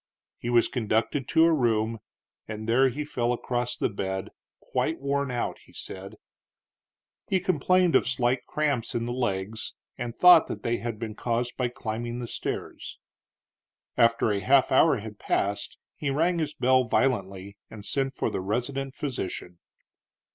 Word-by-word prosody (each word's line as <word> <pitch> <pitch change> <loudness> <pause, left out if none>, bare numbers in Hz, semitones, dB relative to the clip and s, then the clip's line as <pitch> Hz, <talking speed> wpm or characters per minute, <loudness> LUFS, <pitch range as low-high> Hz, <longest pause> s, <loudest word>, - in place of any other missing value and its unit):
He 120 - -4
was 120 -1 +4
conducted 120 +3 -1
to 160 - +5
a 165 - +4
room, 115 -5 +1 0.5
and 110 0 -6
there 130 +4 +4
he 150 +4 -4
fell 120 -5 -1
across 120 0 -2
the - - +1
bed, 95 -2 -4 0.3
quite 165 - -2
worn 140 0 -1
out, 120 -1 -2
he - - -21
said. 95 +1 -7 1.1
He 190 - +3
complained 185 0 +2
of - - +4
slight 125 0 0
cramps 145 -7 -1
in 115 0 -1
the 120 - -3
legs 110 -3 -2 0.2
and 120 -1 -4
thought 180 -2 +8
that 105 - -6
they 120 0 0
had 115 -2 -4
been 110 0 -5
caused 120 +2 -2
by 125 - 0
climbing 120 0 -4
the 120 - -4
stairs. - - -5 1.0
After 115 -2 +3
a 100 - 0
half 130 +7 +4
hour 140 +1 +5
had 105 -1 -8
passed 100 0 -1 0.2
he 145 - -3
rang 165 +5 +1
his 150 -2 -2
bell 130 -2 +3
violently 100 -6 0
and 105 -2 -10
sent 135 -1 -1
for - - -1
the - - -2
resident 130 +7 -2
physician. 95 - -5
120 Hz, 160 wpm, -27 LUFS, 110-135 Hz, 1.1 s, thought